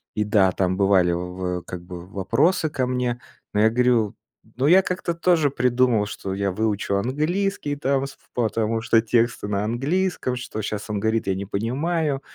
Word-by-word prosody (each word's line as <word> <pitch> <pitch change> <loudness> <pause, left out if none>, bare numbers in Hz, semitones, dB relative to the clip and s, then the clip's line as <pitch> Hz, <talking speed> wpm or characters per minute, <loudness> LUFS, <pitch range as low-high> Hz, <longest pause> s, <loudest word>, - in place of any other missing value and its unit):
И 105 - +1
да, 100 -3 +3
там 95 0 0
бывали 95 -3 +4
в 90 +1 -3
как 90 -1 -7
бы 90 -1 -9
вопросы 115 - +1
ко 130 -3 -1
мне. 125 -1 -1 0.3
Но 105 - +2
я 110 - +6
говорю: 120 -3 +2 0.4
ну, 130 - 0
я 185 +4 +7
как-то 180 -2 -2
тоже 165 -4 +3
придумал, 125 -4 +2
что 95 -1 -5
я 100 0 -1
выучу 100 0 -1
английский 150 - -1
там, 135 -1 0
с 140 - -13 0.2
потому 115 -1 0
что 115 -1 +3
тексты 115 -1 +1
на 100 0 -1
английском, 135 - -1
что 120 -3 -5
щас 105 0 -4
он 105 -1 -1
говорит, 110 +1 0
я 95 - +1
не 100 +1 -4
понимаю. 140 - -1
115 Hz, 175 wpm, -23 LUFS, 100-135 Hz, 0.4 s, я